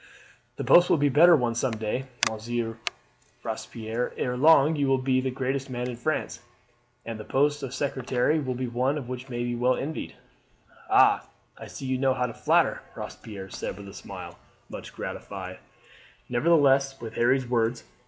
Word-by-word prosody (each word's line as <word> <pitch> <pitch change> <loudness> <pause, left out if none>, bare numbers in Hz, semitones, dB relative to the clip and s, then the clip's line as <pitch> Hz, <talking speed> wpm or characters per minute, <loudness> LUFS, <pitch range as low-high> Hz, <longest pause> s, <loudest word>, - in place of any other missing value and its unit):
"The - - -4
post 175 +1 +6
will - - +5
be 145 0 +3
a - - -2
better 170 +5 +7
one 120 -5 +1
some 120 +1 0
day, 110 +5 -2 0.2
Monsieur 115 +1 -3 0.6
Robespierre. 115 +1 -4
Ere 125 -1 -1
long 150 +2 +5
you 145 -2 +1
will 135 0 +3
be 130 0 +1
the 130 - -1
greatest 135 +1 -2
man 125 -1 -3
in 125 - -4
France, 140 +3 -2 0.7
and 115 -1 -5
the - - -6
post 145 +4 +1
of 135 -3 -5
secretary 135 +1 0
will 130 -4 -2
be 130 +1 -2
one 125 +3 -1
which 125 +1 -6
may 120 0 -2
well 125 +2 +2
be - - -4
envied." 155 +3 -5 0.7
"Ah, - - +5 0.3
I - - -10
see 135 - -8
you 130 -1 -1
know 135 -1 +2
how 125 - 0
to 120 - -5
flatter," - - +2
Robespierre 100 -4 -8
said - - -5
with 100 -1 -10
a - - -11
smile, - - -9 0.3
much - - -8
gratified - - -7 0.7
nevertheless 135 0 +3
with 115 -1 -7
Harry's 125 +2 +2
words. 120 0 0
130 Hz, 175 wpm, -27 LUFS, 120-135 Hz, 0.7 s, better